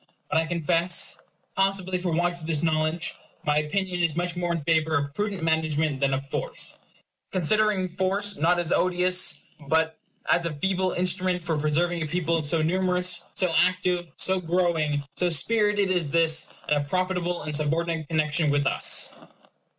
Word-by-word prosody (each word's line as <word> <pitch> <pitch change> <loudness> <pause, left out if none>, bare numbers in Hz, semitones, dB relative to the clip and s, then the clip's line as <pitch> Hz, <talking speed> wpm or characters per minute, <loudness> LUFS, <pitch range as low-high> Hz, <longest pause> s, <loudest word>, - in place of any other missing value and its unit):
But 160 - +3
I 165 - -1
confess, 170 +1 0 0.4
possibly 195 -1 0
for 180 -1 -2
want 175 +1 0
of 160 - -8
this 160 -2 0
knowledge, 160 +1 0 0.3
my 150 0 +2
opinion 180 +4 -1
is 165 -3 +1
much 175 0 -1
more 175 -1 -1
in 165 -3 -2
favor 160 0 +2
of 140 0 -3
prudent 200 0 -3
management 160 -3 0
than 140 0 +1
of 135 +1 -2
force; 135 - -4 0.5
considering 195 +2 +2
force 190 +3 -1
not 170 +4 +2
as 175 -1 -2
an - - +4
odious, 180 0 +1 0.3
but 160 +2 +1 0.3
a 170 -1 +1
feeble 185 +4 0
instrument 180 0 0
for 165 -2 -1
preserving 165 +3 0
a 155 - -2
people 165 0 0
so 155 +2 +1
numerous, 180 +1 0
so 180 -3 +2
active, 180 0 +1
so 190 0 +2
growing, 165 -4 0
so 180 - +2
spirited 205 +3 +2
as 175 -5 0
this, 160 0 +2 0.2
in - - +2
a 145 - 0
profitable 180 +2 -1
and 150 0 -3
subordinate 160 +1 -1
connection 155 0 +1
with 145 0 +1
us. - - +1
170 Hz, 165 wpm, -26 LUFS, 155-180 Hz, 0.5 s, an